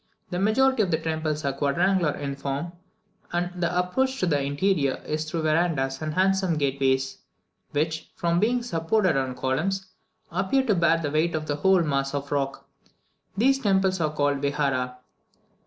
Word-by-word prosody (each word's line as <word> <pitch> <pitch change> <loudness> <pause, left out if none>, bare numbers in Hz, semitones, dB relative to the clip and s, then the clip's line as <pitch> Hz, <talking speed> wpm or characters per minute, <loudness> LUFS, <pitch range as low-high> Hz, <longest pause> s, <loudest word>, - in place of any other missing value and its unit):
The 180 - -1
majority 240 +5 +3
of 195 - +1
the 160 - +2
temples 155 -2 -2
are 140 - 0
quadrangular 165 +4 +1
in 140 -1 -4
form, 140 +4 -4 0.6
and 175 +1 -1
the 175 +1 0
approach 260 +9 0
to - - +1
the 145 -5 +1
interior 145 0 +1
is 155 +1 -2
through 165 0 -2
verandahs 155 -4 +1
and 155 -1 -3
handsome 190 -2 +2
gateways, 135 -1 0 0.5
which, 160 +2 -2
from 170 0 +1
being 240 +4 +1
supported 185 - +1
on 130 -2 -1
columns, 155 +10 -1 0.5
appear 190 +10 +1
to 220 - +3
bear 170 -2 +3
the 145 -3 -2
weight 160 +2 +1
of 155 -1 -2
the 145 -1 -2
whole 190 +2 +4
mass 140 -2 -1
of 140 0 -4
rock. 140 -1 -2 0.7
These 270 +5 +3
temples 190 -5 +2
are 155 -1 +1
called 145 -2 0
"Vihara." 135 -3 -1
160 Hz, 165 wpm, -25 LUFS, 140-190 Hz, 0.7 s, whole